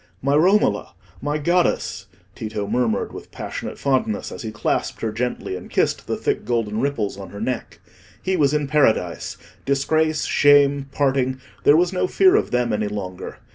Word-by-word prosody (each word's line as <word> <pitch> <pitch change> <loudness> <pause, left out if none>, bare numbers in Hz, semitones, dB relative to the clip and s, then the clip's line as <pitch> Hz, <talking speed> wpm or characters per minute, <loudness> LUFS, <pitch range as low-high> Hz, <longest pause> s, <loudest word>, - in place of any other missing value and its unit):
"My 140 +2 +1
Romola! 190 +8 +3 0.3
my 150 +1 -1
goddess!" 160 - 0 0.3
Tito 110 -2 -4
murmured 115 +1 0
with - - -9
passionate - - -6
fondness, 130 -6 0
as - - -7
he 110 - -5
clasped 105 - -2
her 110 - -1
gently, 115 -4 -3
and - - -9
kissed - - 0
the - - -1
thick - - -1
golden 115 -3 -1
ripples 115 -8 -1
on 95 -2 -8
her 100 - -9
neck. 120 +2 -4 0.4
He 190 - -1
was 145 -5 +3
in 150 -1 0
paradise: 115 - +1 0.3
disgrace, 155 +3 +1
shame, 145 -1 +4
parting—there 135 +1 +1
was 175 +2 +2
no 180 - +1
fear 375 - +4
of - - +2
them 120 -2 0
any 105 0 0
longer. 95 -3 -6
135 Hz, 165 wpm, -22 LUFS, 110-150 Hz, 0.4 s, shame